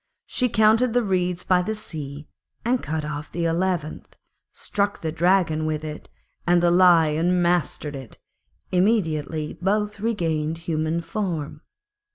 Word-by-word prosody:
She 250 -1 0
counted 220 +2 +4
the 245 0 +2
reeds 180 -3 0
by 180 -1 +3
the 220 +4 -2
sea 150 -7 -7 0.4
and 245 +1 +1
cut 155 -1 -3
off 150 0 -6
the 170 0 -2
eleventh, 165 -2 -2 0.4
struck 205 0 -2
the 160 - -2
Dragon 170 -2 +2
with 155 0 -2
it, 155 -1 -7 0.4
and 175 0 +4
the 175 - +4
Lion 175 -1 +4
mastered 170 -4 0
it; 130 -4 -9 0.5
immediately 160 -6 0
both 205 +2 0
regained 165 -8 -1
human 165 0 -1
form. 165 -6 -4
175 Hz, 135 wpm, -24 LUFS, 155-195 Hz, 0.5 s, counted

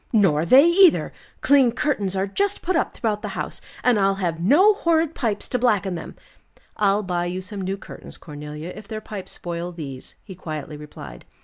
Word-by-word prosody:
"Nor 170 -8 +3
they 270 - +8
either. 360 0 +5 0.3
Clean 275 -4 +5
curtains 225 -7 -1
are 190 0 +1
just 400 - -1
put 370 +1 0
up - - +1
throughout 210 -3 -2
the - - -4
house, - - -4 0.2
and 245 -4 +3
I'll 195 0 +3
have 175 -4 -2
no 335 - +6
horrid 330 -5 +1
pipes 220 -8 -2
to 250 - 0
blacken 205 -6 +1
them." 165 - -7 0.6
"I'll 205 0 +2
buy 175 -2 -1
you 180 +1 -3
some 195 +2 -6
new 190 +1 -2
curtains, - - -8
Cornelia, 150 +3 -8
if 215 -1 -11
their 220 -1 -5
pipes 210 -3 -8
spoil 175 0 -5
these," 140 -6 -8
he 195 - -10
quietly 155 -4 -6
replied. 150 - -11
195 Hz, 190 wpm, -23 LUFS, 175-250 Hz, 0.6 s, they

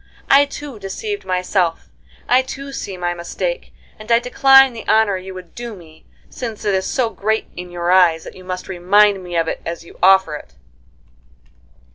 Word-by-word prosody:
I 280 +1 +7
too 280 -4 -9
deceived 405 - -5
myself, 180 -2 -1 0.4
I 250 +1 +5
too 275 +1 -8
see 200 -8 -6
my 175 -1 -2
mistake, 175 - -4 0.3
and 215 +2 -7
I 230 - +7
decline 270 +2 +5
the 225 - -8
honor 220 -3 +3
you 190 0 -7
would 180 -2 -11
do 240 -2 -7
me, 160 -3 -17 0.2
since 230 -5 -7
it 205 - +1
is 190 0 0
so 245 -4 0
great 220 +2 -2
in 180 0 -7
your 175 0 -2
eyes 175 -3 +4
that - - -10
you 185 - -13
must 185 0 -6
remind 195 +2 +3
me 175 -1 -7
of 165 -1 +1
it - - -3
as 170 0 -6
you - - -16
offer 190 -3 +5
it." 105 - -11
190 Hz, 185 wpm, -19 LUFS, 180-240 Hz, 0.4 s, I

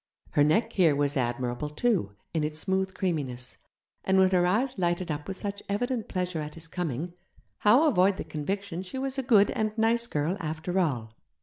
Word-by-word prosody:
Her 145 - +4
neck 220 +10 +2
here 165 -6 +4
was 145 0 +1
admirable, 125 +2 -1
too, 150 - 0 0.2
in 160 -2 0
its 150 0 -2
smooth 190 +2 -1
creaminess; 140 -10 -3 0.5
and 190 0 +2
when 190 0 +5
her 180 -1 +3
eyes 245 +8 +1
lighted 175 -1 0
up 150 0 -4
with 190 -1 -5
such 200 0 -4
evident 235 +3 -1
pleasure 180 -3 -2
at 150 0 -6
his 165 0 -7
coming, 170 -1 -3 0.5
how 245 +10 +5
avoid 190 -6 +3
the - - -3
conviction 185 +3 -3
she 190 +7 -7
was 270 0 -2
a - - +2
good 215 -5 +4
and 215 0 -2
nice 230 +1 +2
girl 155 +3 -1
after 160 +3 -2
all? 120 -11 -1
180 Hz, 190 wpm, -28 LUFS, 150-205 Hz, 0.5 s, when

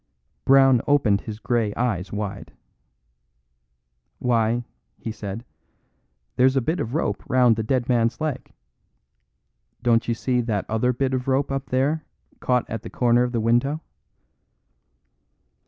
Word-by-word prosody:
Brown 135 -2 +6
opened 115 -9 +3
his 110 -2 -7
grey 115 -2 -1
eyes 105 -7 -1
wide. 100 -1 -5 1.6
"Why," 120 0 +1 0.3
he 115 - -5
said, 110 +1 -7 0.9
"there's 130 +1 +4
a - - +4
bit 160 +8 -1
of 115 +5 -3
rope 105 -11 -1
round 125 -2 +4
the 110 - -2
dead 120 +2 0
man's 115 -1 +1
leg. 155 -4 -4 1.3
Don't 115 -1 +2
you 115 - 0
see 125 +1 0
that 110 -4 -2
other 110 +3 +1
bit 130 +1 -1
of 125 0 -2
rope 135 +1 +1
up 135 0 -3
there 145 +5 0 0.4
caught 125 -1 0
at 115 -1 -5
the - - -8
corner 120 -1 +2
of 125 0 0
the 120 - -1
window?" 120 +7 +1
120 Hz, 140 wpm, -23 LUFS, 115-130 Hz, 1.6 s, Brown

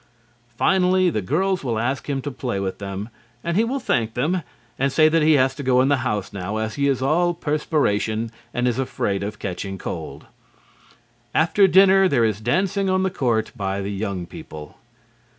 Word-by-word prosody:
Finally, 185 +1 +3
the 105 - -1
girls 180 - 0
will 120 -4 -1
ask 130 +6 -2
him 135 -2 -2
to 145 - -4
play 120 -6 -3
with 95 -1 -3
them, 100 +2 -5 0.3
and 170 0 -1
he 215 - +4
will 260 +4 -1
thank 115 - -1
them 165 +9 0 0.4
and 135 +1 +1
say 155 +3 +5
that 165 +1 +3
he 155 +1 +5
has 130 -2 +3
to 140 - -7
go 125 -2 +3
in 130 +2 +3
the 145 - +3
house 105 -7 -3
now 100 +2 -4
as 110 0 -2
he 140 0 0
is 130 -2 0
all 175 +5 +2
perspiration 115 -9 0 0.2
and 125 +1 0
is 120 +1 0
afraid 100 -6 -1
of 100 +1 -4
catching 95 +1 -5
cold. - - -6 1.1
After 190 +5 +4
dinner 190 +1 +6
there 125 -8 +2
is 110 -1 -1
dancing 190 - 0
on 185 0 +2
the 190 - 0
court 115 -7 0
by 100 -3 -2
the 100 +1 -3
young 100 -3 -3
people. 75 -2 -10
130 Hz, 190 wpm, -22 LUFS, 105-170 Hz, 1.1 s, dinner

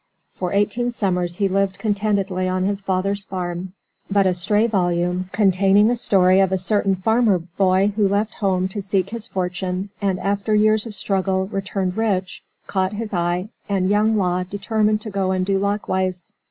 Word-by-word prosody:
For 180 -2 -3
eighteen 205 +4 +1
summers 180 -6 -1
he 200 +2 +1
lived 195 0 0
contentedly 200 -3 -1
on 185 0 0
his 200 +1 -1
father's 195 +1 -1
farm, 180 -1 -5 0.4
but 200 -1 +3
a 185 - +3
stray 205 +5 +1
volume, 180 -3 0
containing 195 +2 +4
a - - +1
story 190 -4 +3
of 190 -1 +3
a 190 - +2
certain 195 +1 +1
farmer 220 +1 +2
boy 185 +3 +1
who 210 -2 +3
left 205 +2 0
home 185 -2 0
to 205 +2 -4
seek 195 0 -1
his 230 -1 -6
fortune, 185 0 -3
and 195 -2 0
after 200 +2 0
years 215 +1 +3
of 215 - -8
struggle 190 -1 0
returned 195 -1 -3
rich, 195 -5 -1 0.2
caught 190 0 -1
his 215 0 -5
eye, 175 +2 -1 0.2
and 195 -1 +1
young 215 +1 +3
Law 180 -2 +1
determined 210 +3 0
to 215 - -7
go 195 -1 -1
and 185 -1 0
do 195 0 +1
likewise. 190 -3 -2
195 Hz, 175 wpm, -21 LUFS, 185-205 Hz, 0.4 s, containing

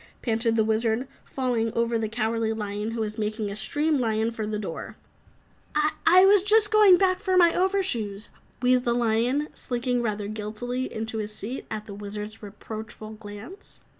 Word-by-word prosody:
panted 225 -1 +1
the 220 - +3
Wizard, 220 +3 0 0.2
falling 245 -4 -1
over 235 0 +1
the 220 -1 0
Cowardly 225 0 0
Lion 210 0 -3
who 230 0 -3
was 215 0 -3
making 215 -1 -2
a - - -5
stream 295 +7 +1
lion 225 -1 0
for 220 -2 -4
the 215 0 -2
door. 195 -6 -6 1.1
"I 370 +2 +8
was 400 0 +6
just 420 +1 +4
going 420 -4 +7
back 370 0 +2
for 375 -2 +1
my 340 -2 +6
over 380 +2 +2
shoes," 215 - -2 0.3
wheezed 250 0 +4
the 235 -1 +2
lion, 240 +5 +1
slinking 245 0 -2
rather 210 -3 -2
guiltily 220 +4 -4
into 220 0 -3
his 210 0 -5
seat 235 +7 -6
at 215 -1 -5
the 205 - -8
Wizard's 210 +1 -6
reproachful 215 +1 -8
glance. 215 - -11
225 Hz, 170 wpm, -26 LUFS, 215-255 Hz, 1.1 s, I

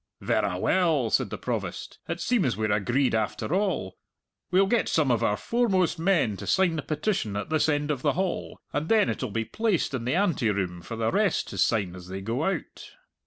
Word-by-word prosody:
"Verra 95 -3 0
well," 155 - +2
said - - +2
the - - -5
Provost; - - -4
"it 170 +1 -3
seems 185 - +1
we're 110 -1 0
agreed 120 +6 +1
after 110 +6 -1
all. 185 - -1 0.5
We'll 185 +2 +4
get 225 +3 +1
some 150 -5 +2
of 120 - +1
our 105 - +2
foremost 195 -9 +1
men 165 - +2
to - - -8
sign 190 -3 +3
the 155 - -2
petition 155 - -2
at 105 - -5
this 155 0 +2
end 145 0 0
of 135 -4 -3
the - - +2
hall, 185 0 -2 0.2
and 155 +2 -2
then 220 -3 +4
it'll 130 - -3
be 115 +2 -2
placed 215 - 0
in 120 -3 -3
the 130 +5 +1
anteroom 105 - 0
for 115 - -7
the 115 0 0
rest 205 -4 +1
to - - -6
sign 100 -6 +1
as 90 -1 -10
they 95 +1 -6
go 115 +9 -2
out." 190 -5 -4
145 Hz, 205 wpm, -26 LUFS, -, 0.5 s, We'll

